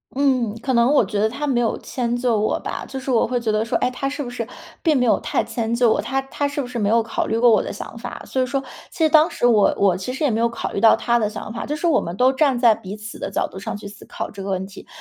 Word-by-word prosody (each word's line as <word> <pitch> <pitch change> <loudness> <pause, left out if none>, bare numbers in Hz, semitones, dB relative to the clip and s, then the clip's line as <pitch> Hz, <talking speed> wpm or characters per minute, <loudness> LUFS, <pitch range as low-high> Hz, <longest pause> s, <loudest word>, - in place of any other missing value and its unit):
嗯， 255 -6 +1
可 265 - 0
能 235 +3 +4
我 295 - +5
觉 210 - -3
得 215 - +3
他 270 +7 -4
没 265 -4 +1
有 230 -2 0
迁 240 -2 -2
就 240 -3 +1
我 215 - +1
吧。 - - -5
就 270 - -7
是 265 0 -3
我 235 - +3
会 245 +1 -1
觉 225 -2 0
得 215 +1 0
说， 230 - 0
哎， 250 - +1
他 265 +2 -3
是 290 +2 -3
不 245 - -6
是 240 -2 -5 0.3
并 315 -4 +3
没 250 - +2
有 230 - +3
太 - - -1
迁 230 -2 -2
就 235 -1 +4
我， - - +1
他 270 +1 -1
他 285 +2 -2
是 285 0 -3
不 255 - -5
是 245 -1 -4
没 205 - +1
有 230 +2 +3
考 225 - -2
虑 225 - 0
过 240 +1 +5
我 215 - +4
的 - - -5
想 205 - -8
法。 245 +1 -7
所 260 - -1
以 - - +2
说， 270 +1 -2 0.3
其 - - -14
实 315 - +5
当 310 +2 +5
时 - - -2
我 225 -4 +4
我 190 -3 +3
其 190 +7 -5
实 265 - -4
也 290 - +3
没 220 - 0
有 235 - +3
考 235 - -5
虑 - - -2
到 225 +1 +6
他 235 0 +1
的 210 -2 0
想 215 0 -7
法， 230 - -5
就 295 - -2
是 330 +3 -1
我 310 -4 +4
们 170 - -5
都 255 +5 +4
站 270 -1 +2
在 240 -2 +5
彼 200 -1 -8
此 215 0 -9
的 - - -4
角 - - -1
度 190 - -9
上 - - -5
去 205 - -9
思 205 - -13
考 - - -6
这 200 - -9
个 195 - -5
问 190 -1 -1
题， 195 +1 -12
240 Hz, 350 characters per minute, -21 LUFS, 215-265 Hz, 0.3 s, 到